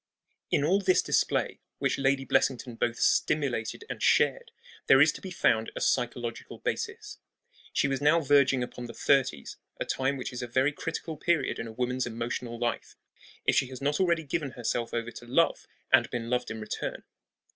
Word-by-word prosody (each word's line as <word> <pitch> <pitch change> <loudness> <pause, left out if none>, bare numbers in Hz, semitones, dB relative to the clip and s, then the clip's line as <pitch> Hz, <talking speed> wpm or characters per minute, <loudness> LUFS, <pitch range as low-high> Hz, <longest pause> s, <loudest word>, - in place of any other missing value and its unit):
In 140 - +2
all 185 +7 +3
this 185 -1 +3
display, - - 0 0.2
which - - 0
Lady 135 0 +1
Blessington 130 -1 +1
both 120 +1 -1
stimulated 130 -7 0
and - - -6
shared, - - +2 0.4
there 135 - +7
is 150 +2 +6
to - - -10
be 190 - -6
found 115 -10 +1
a - - -3
psychological 120 -1 -2
basis. - - -4 0.5
She - - +1
was 135 -1 -2
now 150 +3 +5
verging 140 -3 +3
upon 125 0 -7
the 115 - -10
thirties 130 - +1 0.2
a - - -2
time 135 +1 -1
which 130 0 -5
is 125 - -5
a 120 - -4
very 130 +4 +2
critical 160 +1 -5
period 170 +1 0
in 115 - -4
a - - -7
woman's 125 +2 -1
emotional 120 0 -4
life, 120 0 -3 0.5
if - - +3
she 135 - +3
has 130 -1 -9
not 145 +2 0
already 170 -3 +2
given 145 -2 -3
herself 120 -1 -2
over 120 0 -3
to 120 - -11
love 165 +7 +2 0.3
and - - +6
been 120 -1 -4
loved 125 0 0
in 115 - -5
return. 110 0 -5
130 Hz, 185 wpm, -28 LUFS, 120-145 Hz, 0.5 s, there